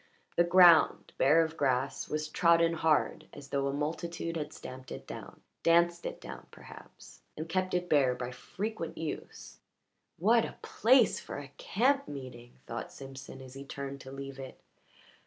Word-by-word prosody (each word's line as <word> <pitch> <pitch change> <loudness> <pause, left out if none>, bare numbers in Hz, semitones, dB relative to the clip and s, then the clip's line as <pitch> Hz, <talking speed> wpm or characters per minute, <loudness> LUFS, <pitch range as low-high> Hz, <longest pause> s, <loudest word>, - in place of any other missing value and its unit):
The 170 - +5
ground, 175 -2 +6
bare 155 +5 +6
of 160 0 -4
grass, 135 -2 0
was 155 0 -2
trodden 170 +1 +4
hard, 160 -2 +1
as 140 -1 -11
though 140 0 0
a - - 0
multitude 165 +3 -3
had 150 -2 -3
stamped 130 -3 -10
it - - -7
down - - -9 0.2
danced 170 +1 +3
it - - -6
down, - - -9
perhaps - - -14 0.2
and 155 +2 -4
kept 185 +2 -1
it 180 0 -1
bare 135 -6 +3
by 125 0 -5
frequent 195 - -5
use. 160 -2 -6 0.6
"What 225 +6 +4
a - - -6
place 245 0 +4
for - - -7
a 145 -1 -8
camp 275 +6 +1
meeting!" 125 -4 -9
thought 115 - -6
Simpson 135 0 -10
as 130 -1 -12
he 135 +1 -8
turned 140 0 -6
to 130 - -10
leave 135 0 -7
it. 130 -1 -9
155 Hz, 165 wpm, -31 LUFS, 135-170 Hz, 0.6 s, ground